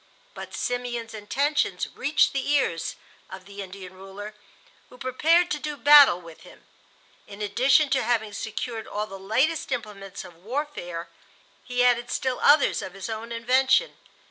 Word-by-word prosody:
But - - -8
Simeon's 240 -2 -3
intentions 245 0 -1
reached 290 +4 +2
the 275 0 -2
ears 265 - 0 0.3
of 190 -1 -10
the 200 0 -9
Indian 190 -1 -9
ruler, 195 +3 -9 0.6
who 250 - -15
prepared 320 +7 +2
to 300 - -1
do 300 -1 -5
battle 285 -7 +7
with 165 -2 -14
him. - - -16 0.6
In 200 - -11
addition 260 +8 +3
to 270 - +3
having 220 -2 0
secured 225 +2 -5
all 210 +1 -3
the 195 -2 -10
latest 260 +12 0
implements 205 -5 -5
of 170 - -14
warfare, 220 - -5 0.5
he 245 0 0
added 240 -1 +2
still 260 -1 -1
others 290 0 +4
of 185 - -7
his 195 +3 -6
own 225 +1 -6
invention. 260 - +2
235 Hz, 150 wpm, -25 LUFS, 200-275 Hz, 0.6 s, battle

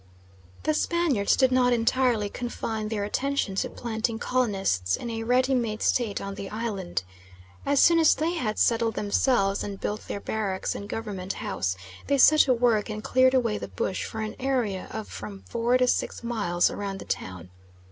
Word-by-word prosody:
The 310 - +2
Spaniards 305 - +1
did 260 -1 +3
not 250 -1 +4
entirely 235 -2 +2
confine 220 -1 -4
their 215 -2 -2
attention 265 0 -1
to 190 - -1
planting 225 -1 -3
colonists 195 - 0
in 235 - -5
a 225 0 -3
ready 255 +3 +2
made 230 -4 -1
state 225 -5 +1
on 200 0 -5
the 195 0 -7
island. 210 - -3 0.6
As 285 -1 +3
soon 335 -1 +6
as 320 - +5
they 325 +3 -1
had 240 -11 -2
settled 230 -1 +2
themselves 200 -1 +1
and 200 -1 -6
built 210 +1 -4
their - - -4
barracks 200 -2 -2
and 200 - -7
Government 200 -5 -4
House, 95 0 -2 0.3
they 280 - +2
set 305 +3 +7
to 265 - +6
work 230 -3 +2
and 215 0 -5
cleared 255 +1 +4
away 230 -5 +1
the - - -5
bush 185 - -3
for 220 - -5
an 215 0 -4
area 245 -8 -1
of 220 -1 -6
from 200 -2 -8
four 235 +2 +1
to 250 0 +2
six 250 - -1
miles 205 -7 +1
round 200 -1 -4
the - - -9
town. 90 -1 -5
225 Hz, 180 wpm, -26 LUFS, 200-255 Hz, 0.6 s, set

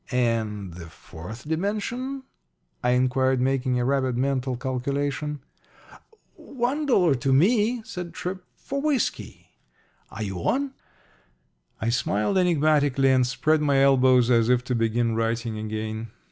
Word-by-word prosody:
"And 110 -6 -1
the 85 -1 -9
fourth 90 - -11
dimension?" 215 - -2 0.6
I 125 0 +3
inquired, 130 +1 +2
making 130 -1 0
a 120 - 0
rapid 130 -2 0
mental 130 -1 -1
calculation. 140 +3 -3 0.9
"One 270 +4 -3
dollar 180 - +4
to 135 +1 -1
me," 220 - +3
said 180 -2 -6
Tripp. 185 +1 -5
"For 275 0 -5
whiskey. 290 -5 -2 0.6
Are 110 - -6
you 95 -3 -4
on?" 270 - -1 1.1
I 115 - -1
smiled 115 - +1
enigmatically 145 -6 +3
and 130 -1 +3
spread 155 +4 +1
my 140 -2 +2
elbows 130 -2 +4
as 115 -1 +3
if 125 0 +3
to 125 - -3
begin 115 0 +1
writing 115 0 -2
again. 110 +1 -4
130 Hz, 130 wpm, -25 LUFS, 115-165 Hz, 1.1 s, dollar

